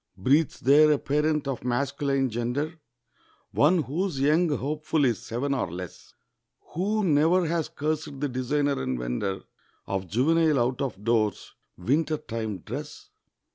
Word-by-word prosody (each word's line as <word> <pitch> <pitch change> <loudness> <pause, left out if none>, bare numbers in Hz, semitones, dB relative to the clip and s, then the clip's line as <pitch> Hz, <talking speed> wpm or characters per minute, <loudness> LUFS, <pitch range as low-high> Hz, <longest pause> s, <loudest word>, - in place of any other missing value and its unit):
Breathes 140 +11 +2
there 150 +4 +6
a 150 - +3
parent 150 +1 0
of 135 -3 -3
masculine 135 +1 0
gender, 125 +8 -2 0.8
One 160 +3 +3
whose 160 +2 -2
young 155 +5 +3
hopeful 150 +2 0
is 115 -6 0
seven 135 +5 -2
or 125 -10 -2
less, 90 0 -9 0.6
Who 210 +5 0
never 165 +2 +3
has 165 -1 -1
cursed 150 -1 -3
the 145 - 0
designer 140 +2 0
and 65 - -2
vender 60 +11 -3 0.4
Of 95 -1 -3
juvenile 155 - +2
out 125 +1 0
of 110 -8 -4
doors 110 -2 0 0.2
winter 150 - 0
time 110 - -5
dress? - - -8
140 Hz, 135 wpm, -26 LUFS, 120-155 Hz, 0.8 s, there